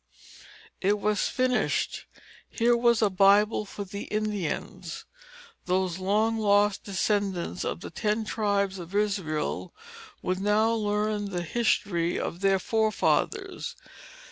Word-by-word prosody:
It 205 +2 +2
was 210 +1 +1
finished. 255 -1 0 0.4
Here 240 +1 +2
was 235 -1 +3
a 210 - +4
Bible 200 +3 +4
for 205 0 -6
the 200 +1 -7
Indians. 210 -5 -3 0.6
Those 185 -1 0
long 215 +4 +1
lost 205 -1 +3
descendants 195 -2 -1
of - - -3
the - - -7
ten 215 0 -1
tribes 200 -3 0
of 175 +3 -8
Israel 195 - -1 0.5
would 185 0 -1
now 210 +3 +3
learn 210 -1 0
the 180 -3 -3
history 175 -4 0
of 170 - -4
their 195 0 +3
forefathers. 225 - 0
205 Hz, 115 wpm, -27 LUFS, 190-215 Hz, 0.6 s, a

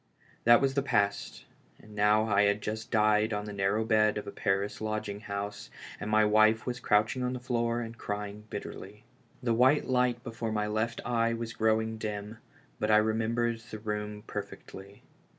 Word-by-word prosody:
That 120 0 +7
was 135 -1 +2
the 140 - +1
past, 105 -7 -1 0.3
and 105 - -15
now 105 +1 +3
I 100 -2 +3
had 100 +1 +2
just 110 +1 -4
died 110 0 +3
on 105 0 -2
the 105 - -6
narrow 100 +3 0
bed 110 -1 +3
of 105 - -4
a 100 - -6
Paris 100 +2 -1
lodging 110 -2 -3
house, 100 0 -5 0.3
and 105 - -4
my 110 0 +4
wife 110 +1 +4
was 125 0 -3
crouching 110 +5 +2
on 125 0 -1
the 125 - -4
floor 120 -1 -1
and 115 0 -6
crying 105 -1 -5
bitterly. 100 +1 -8 0.4
The 120 -2 +2
white 130 +5 +4
light 125 -1 +1
before 115 -2 -4
my 105 -1 0
left 110 +2 -2
eye 115 -1 +1
was 115 -1 -5
growing 110 0 +1
dim, 105 0 -5 0.4
but 105 - 0
I 105 0 +6
remem 110 +1 0
bered 120 0 -1
the 110 - -6
room 105 -1 -4
perfectly. 100 +1 -8
110 Hz, 185 wpm, -29 LUFS, 105-115 Hz, 0.4 s, That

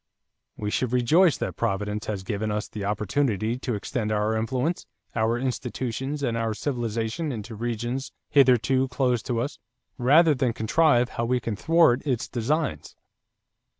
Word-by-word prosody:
We 105 -1 -3
should 125 +1 -1
rejoice 155 +7 +4
that - - -3
Providence 105 -1 -2
has 100 -3 -3
given 105 +2 -2
us 105 0 -2
the 105 - -6
opportunity 110 +2 0
to 125 -3 -2
extend 110 +1 -3
our 105 +1 +1
influence, 130 +9 -1 0.3
our 115 +1 +1
institutions, 130 +2 -3
and 120 -3 0
our 115 -1 -1
civilization 120 +3 -2
into 115 -1 -6
regions 120 +4 -3 0.2
hitherto 130 -1 +4
closed 125 -3 0
to 120 -2 0
us, 135 +5 -3 0.4
rather 150 +6 +5
than 125 -3 0
contrive 125 +2 +3
how 115 - -2
we 125 +1 +1
can 115 -2 -3
thwart 160 0 +4
its 130 -6 -1
designs." 125 - -2
120 Hz, 150 wpm, -25 LUFS, 110-135 Hz, 0.4 s, rather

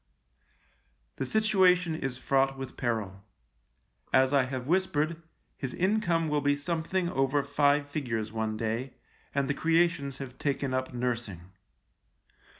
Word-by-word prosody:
The 135 - -2
situation 185 -4 +3
is 135 -5 -3
fraught 135 0 +1
with 135 -1 -7
peril. 105 -5 -2 0.9
As 130 +1 +4
I 135 -2 +4
have 130 -1 -4
whispered, 165 -1 0 0.3
his 130 -2 -5
income 180 -4 +1
will 150 -1 +1
be 145 0 +2
something 170 +4 -1
over 135 -1 +1
five 145 0 +2
figures 115 -7 -3
one 110 -1 -2
day, 115 +4 -3 0.4
and 140 -1 +1
the 145 - +1
creations 165 -4 +1
have 130 -2 -8
taken 140 -2 -1
up 130 0 -1
nursing. 115 -8 -3
140 Hz, 130 wpm, -29 LUFS, 125-160 Hz, 0.9 s, As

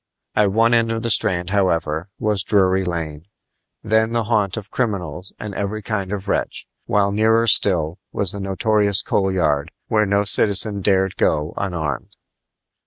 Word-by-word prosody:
At 105 -2 +3
one 115 +3 +3
end 115 -1 +2
of 115 0 -3
the 115 - +1
Strand, 90 -4 +2
however, 85 -3 0
was 105 -2 0
Drury 95 0 +2
Lane, 80 -3 -5 0.6
then 110 +1 +1
the 115 -1 +1
haunt 105 -3 0
of 100 -2 -8
criminals 90 -7 -3
and 105 -1 -6
every 100 +2 -4
kind 100 -3 -3
of 100 -1 -5
wretch, - - -2 0.2
while 100 -1 +2
nearer 110 +2 +2
still 90 -5 +1
was 100 -2 +1
the 100 - -7
notorious 100 +1 +2
Coal 95 -1 0
Yard, 75 -5 0 0.2
where 105 -3 +2
no 100 +1 +2
citizen 100 0 +2
dared 95 -1 +1
go 75 0 0
unarmed. 80 -8 -4
100 Hz, 160 wpm, -20 LUFS, 90-105 Hz, 0.6 s, At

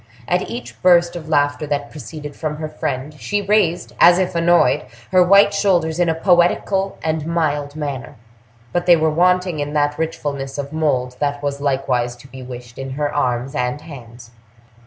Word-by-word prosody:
At 180 +1 0
each 240 +1 -8
burst 175 -1 +4
of 160 -2 -7
laughter 145 0 +1
that 145 -1 -2
proceeded 150 0 -8
from 155 -2 -3
her 155 0 -4
friend, 145 -1 -4
she 205 - -1
raised, 200 -4 +1
as 175 0 +7
if 185 -1 0
annoyed, 170 +1 +3 0.2
her 185 -1 +5
white 200 +3 +6
shoulders 175 -5 +1
in 175 -1 +3
a 160 - +1
poetical 185 +3 +2
and 155 -1 -2
mild 150 -4 -1
manner, 145 -3 -5 0.6
but 175 0 -1
they 175 - +8
were 160 -1 +1
wanting 180 0 +2
in 145 0 -3
that 145 0 0
richfulness 140 -4 -3
of 140 +1 -5
mold 130 -5 -1
that 145 0 -2
was 140 0 -3
likewise 130 -3 0
to 125 +2 -16
be 130 -1 -11
wished 125 -1 -10
in 135 0 -5
her 145 -1 -1
arms 125 -1 -1
and 125 0 -2
hands. 120 -6 -12
150 Hz, 180 wpm, -19 LUFS, 140-175 Hz, 0.6 s, they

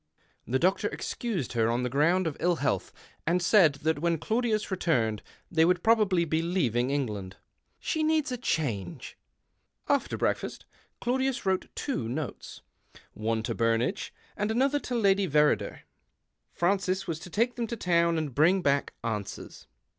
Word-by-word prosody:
The 125 +4 +1
doctor 190 +7 +2
excused 205 - -3
her 115 -1 +2
on 120 +2 0
the - - 0
ground 165 +8 +2
of 160 -3 -2
ill 175 +1 +2
health, 145 -3 -1 0.4
and 175 +2 +3
said 175 -3 +5
that 160 -1 +1
when 170 +1 +1
Claudius 220 +3 -1
returned 120 - 0 0.3
they 160 -2 +4
would 180 +1 +2
probably 210 -6 +3
be 160 0 0
leaving 135 - 0
England. 105 -10 -3 0.2
" - - -47
She 315 - +1
needs 310 -2 +1
a 250 - -2
change." 115 - -3 0.7
After - - +1
breakfast - - -2 0.4
Claudius 260 0 0
wrote 190 -1 0
two 130 - -2
notes 145 +3 -5 0.3
— - - -38 0.2
one 110 +1 -1
to - - -2
Burnage 115 - 0 0.2
and 210 +1 -1
the 240 +4 +3
other 290 +1 +1
to 250 - -4
Lady 200 -3 +3
Verrider. 150 +1 +2 0.7
Francis 190 +1 0
was 165 -3 -3
to 180 - -10
take 235 +7 +1
them 235 -2 -3
to 235 - -4
town 170 -3 +2
and 155 -4 -2
l)ring 175 +5 +4
back 140 0 +1
answers. 105 - -5
170 Hz, 160 wpm, -28 LUFS, 135-210 Hz, 0.7 s, said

